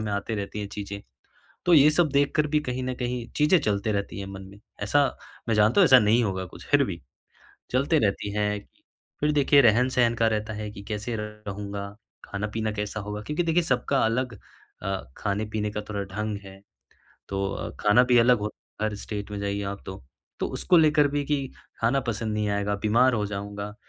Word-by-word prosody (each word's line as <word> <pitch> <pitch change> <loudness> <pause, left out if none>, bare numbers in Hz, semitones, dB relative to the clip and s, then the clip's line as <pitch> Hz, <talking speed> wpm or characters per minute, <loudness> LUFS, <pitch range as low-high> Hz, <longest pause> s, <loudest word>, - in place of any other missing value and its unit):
में 110 -1 -3
आती 100 +2 -2
रहती 100 0 -4
हैं 100 - -4
चीज़ें। 100 -1 -6 0.7
तो 175 - +6
ये 150 0 +7
सब 165 +1 +3
देखकर 145 +2 +2
भी 150 0 +1
कहीं 130 -2 -3
न 130 - -2
कहीं 125 -1 -3
चीज़ें 150 +5 +5
चलते 105 +1 0
रहती 100 0 -3
हैं 100 - -5
मन 95 0 -8
में। 100 - -15 0.2
ऐसा 140 +8 +3 0.4
मैं 115 - +2
जानता 105 - +4
हूँ, - - +8
ऐसा 130 -1 +8
नहीं 110 +2 +3
होगा 95 -2 -2
कुछ, - - -13
फ़िर - - +4
भी - - -5 0.7
चलते 140 +5 +2
रहती 100 0 0
हैं। 105 0 0 0.6
फ़िर 150 +1 +3
देखिए 140 -1 +5
रहन-सहन 120 +1 +3
का 115 0 +2
रहता 110 0 -1
है 105 0 -5
कि 100 -1 -10
कैसे 105 +3 -4
रहूँगा? 100 -1 -6 0.4
खाना-पीना 105 +2 -3
कैसा 105 +1 -4
होगा? 105 +1 -5
क्योंकि 150 +10 -2
देखिए 170 +1 +2
सबका 135 -1 +1
अलग 120 +1 -1 0.5
अ, 95 -1 -2 0.2
खाने-पीने 105 +1 -2
का 105 0 -3
थोड़ा 100 -1 -2
ढंग 105 -1 -2
है, 95 0 -12 0.7
तो 100 0 -3
खाना 105 +4 +5
भी 125 -1 +4
अलग 120 +1 +5
होता 105 0 -6
है। - - +2
हर 105 - -5
स्टेट 105 0 -6
में 105 - -4
जाइए 100 0 -2
आप 100 0 -5
तो, 95 -8 -8 0.4
तो - - +1
उसको 180 - +2
लेकर 150 -2 +4
भी 145 0 -1
कि 140 -2 0 0.3
खाना 120 +5 +2
पसंद 110 -1 -2
नहीं 105 -1 0
आएगा, 100 0 0
बीमार 120 +4 +4
हो 105 -2 0
जाऊँगा। 100 0 -5
105 Hz, 195 wpm, -26 LUFS, 100-125 Hz, 0.7 s, हूँ